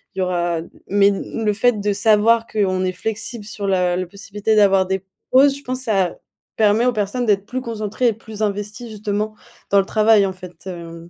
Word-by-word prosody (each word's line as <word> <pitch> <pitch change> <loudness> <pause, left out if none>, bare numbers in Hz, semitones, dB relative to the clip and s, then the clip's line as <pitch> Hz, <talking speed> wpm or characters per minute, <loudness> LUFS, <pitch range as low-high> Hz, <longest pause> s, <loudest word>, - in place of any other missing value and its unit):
il - - -5
y - - +1
aura 175 -2 0 0.3
mais 200 0 +4
l 205 +3 -4
le 210 - +2
fait 230 +1 +2
de 205 0 0
savoir 220 +3 +3
qu'on 190 -3 0
est 185 - 0
flexible 220 +3 -4
sur 205 -1 -5
la 180 -2 +2
la 185 - -2
possibilité 205 +3 -2
d'avoir 195 -2 +5
des 190 0 -2 0.3
pauses 275 +1 +5
je 280 - -14
pense 255 0 -3
ça 195 -7 0 0.4
permet 220 +2 +3
aux 250 - +2
personnes 215 +3 -1
d'être 205 -3 +1
plus 255 +1 -3
concentrées 225 0 -2
et - - -1
plus 220 0 -10
investies 210 +3 -3
justement 210 0 -3 0.4
dans 200 - +6
le 195 - +1
travail, 215 -1 +4
en 190 - -2
fait, 185 -1 -12
hem. 170 -2 -8
205 Hz, 205 wpm, -20 LUFS, 190-220 Hz, 0.4 s, dans